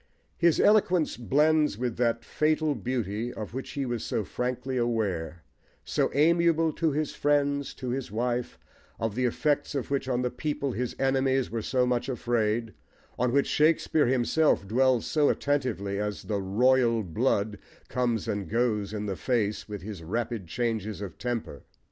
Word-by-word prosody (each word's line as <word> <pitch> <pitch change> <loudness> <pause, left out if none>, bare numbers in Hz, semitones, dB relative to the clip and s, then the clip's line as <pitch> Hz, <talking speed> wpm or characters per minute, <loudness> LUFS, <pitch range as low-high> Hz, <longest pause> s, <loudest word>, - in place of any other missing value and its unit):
His 170 -2 +3
eloquence 185 -6 +3
blends 150 +1 +2
with 120 -1 -2
that 115 -1 0
fatal 155 0 +1
beauty, 115 -1 -3
of 110 -2 -7
which 130 +1 -5
he 140 -1 -2
was 120 -3 -3
so - - -1
frankly 125 +4 -3
aware, 95 -9 -1 0.4
so - - +1
amiable 165 +1 +3
to 160 0 +1
his 150 +1 -1
friends, 145 -1 +1
to 130 - -5
his 130 -3 -3
wife, 120 +2 -2 0.4
of 110 -2 -1
the 125 +3 0
effects 145 +4 0
of 140 0 -3
which 135 -1 -1
on 125 -1 0
the 125 - -1
people 145 -3 -2
his 125 +1 -3
enemies 135 -1 +1
were 115 0 -2
so 125 +3 +1
much 125 +1 0
afraid, 115 -2 0 0.5
on 125 -1 +2
which 140 +2 +3
Shakespeare 155 -1 +2
himself 130 -2 +2
dwells 125 +2 +2
so 150 -2 +2
attentively 120 -9 -1
as 105 0 -3
the 100 -2 -2
"royal 115 +3 +3
blood" 105 +2 0 0.3
comes 120 -4 -1
and 100 -5 -3
goes 110 -3 0
in 105 -1 -3
the 100 -2 -2
face 110 -2 -1
with 105 -3 -6
his 100 -4 -7
rapid 110 +2 -3
changes 110 0 -2
of 100 - -7
temper. 120 -11 -4
125 Hz, 160 wpm, -28 LUFS, 110-140 Hz, 0.5 s, His